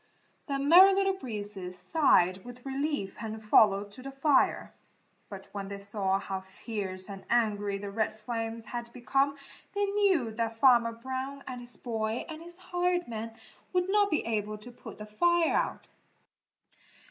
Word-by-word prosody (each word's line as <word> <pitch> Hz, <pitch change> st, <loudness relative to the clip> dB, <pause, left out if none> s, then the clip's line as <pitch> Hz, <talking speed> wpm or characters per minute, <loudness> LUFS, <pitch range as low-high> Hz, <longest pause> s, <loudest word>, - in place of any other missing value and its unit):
The 280 Hz, -2 st, -1 dB
Merry 350 Hz, +8 st, +7 dB
Little 390 Hz, 0 st, +2 dB
Breezes 205 Hz, -, -6 dB
sighed 185 Hz, -, +3 dB
with 245 Hz, +1 st, -11 dB
relief 275 Hz, -6 st, -2 dB
and 220 Hz, -1 st, -5 dB
followed 205 Hz, -2 st, +4 dB
to 220 Hz, -, -7 dB
the 270 Hz, -, -7 dB
fire. 275 Hz, +1 st, +2 dB, 0.6 s
But 195 Hz, -1 st, -9 dB
when 200 Hz, -1 st, -5 dB
they 200 Hz, 0 st, -6 dB
saw 200 Hz, -1 st, 0 dB
how 195 Hz, -1 st, -4 dB
fierce 190 Hz, -1 st, -4 dB
and 195 Hz, -2 st, -8 dB
angry 205 Hz, -4 st, +1 dB
the 200 Hz, 0 st, -6 dB
red 215 Hz, +1 st, -1 dB
flames 225 Hz, +1 st, -4 dB
had 240 Hz, -1 st, -6 dB
become 275 Hz, +3 st, 0 dB, 0.4 s
they 405 Hz, 0 st, +2 dB
knew 395 Hz, -, +2 dB
that 225 Hz, 0 st, -3 dB
Farmer 235 Hz, -2 st, +5 dB
Brown 260 Hz, +3 st, -5 dB
and 255 Hz, -1 st, -6 dB
his 240 Hz, 0 st, 0 dB
boy 220 Hz, -1 st, -3 dB
and 320 Hz, -1 st, -8 dB
his 345 Hz, +1 st, -12 dB
hired 355 Hz, -1 st, -1 dB
man 225 Hz, -1 st, -6 dB, 0.4 s
would 360 Hz, 0 st, +1 dB
not 410 Hz, 0 st, +4 dB
be 310 Hz, -, 0 dB
able 215 Hz, -2 st, -2 dB
to 210 Hz, +4 st, -12 dB
put 240 Hz, -, -11 dB
the 210 Hz, -, -8 dB
fire 340 Hz, +10 st, +2 dB
out. -, -, -1 dB
230 Hz, 160 wpm, -29 LUFS, 205-280 Hz, 0.6 s, Merry